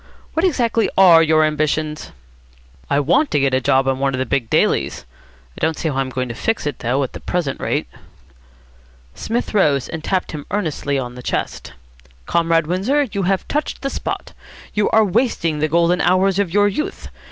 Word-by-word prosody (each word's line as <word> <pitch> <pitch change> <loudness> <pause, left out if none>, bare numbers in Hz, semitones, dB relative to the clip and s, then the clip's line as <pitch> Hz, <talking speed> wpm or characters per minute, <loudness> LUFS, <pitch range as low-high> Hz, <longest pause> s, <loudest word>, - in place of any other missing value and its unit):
What 325 - 0
exactly 235 - +1
are 175 -4 +8
your 155 -1 +4
ambitions?" 155 0 -1 0.8
"I 140 - +2
want 265 - +2
to 145 - +1
get 135 -1 +1
a 130 - +2
job 135 0 +2
on 135 0 0
one 135 -1 0
of - - -4
the 130 - -1
big 125 -3 -1
dailies. - - +1 0.5
I - - -12
don't 160 0 0
see 160 - -1
how 135 - -3
I'm 135 -1 -1
going 130 0 -3
to 120 - -5
fix 225 - -2
it, 145 - -3
though, 130 +4 0
at 130 - -5
the - - -7
present 170 -7 -2
rate." - - -1 1.3
Psmith 235 - -3
rose, 145 -10 +2
and 160 -1 -6
tapped 185 +1 -1
him 150 -2 -7
earnestly 155 -7 -2
on 125 -2 -4
the 125 - -9
chest. - - -4 0.5
"Comrade 165 -1 +2
Windsor, 200 - +1
you 200 - -2
have 195 -1 0
touched 300 -1 -3
the 275 - -1
spot. - - -5 0.4
You 210 0 +1
are 220 -1 +4
wasting 190 - 0
the 155 - +1
golden 170 +3 +2
hours 185 +2 +2
of 195 -4 0
your 205 +2 +4
youth. 205 +10 -4
165 Hz, 195 wpm, -19 LUFS, 140-200 Hz, 1.3 s, are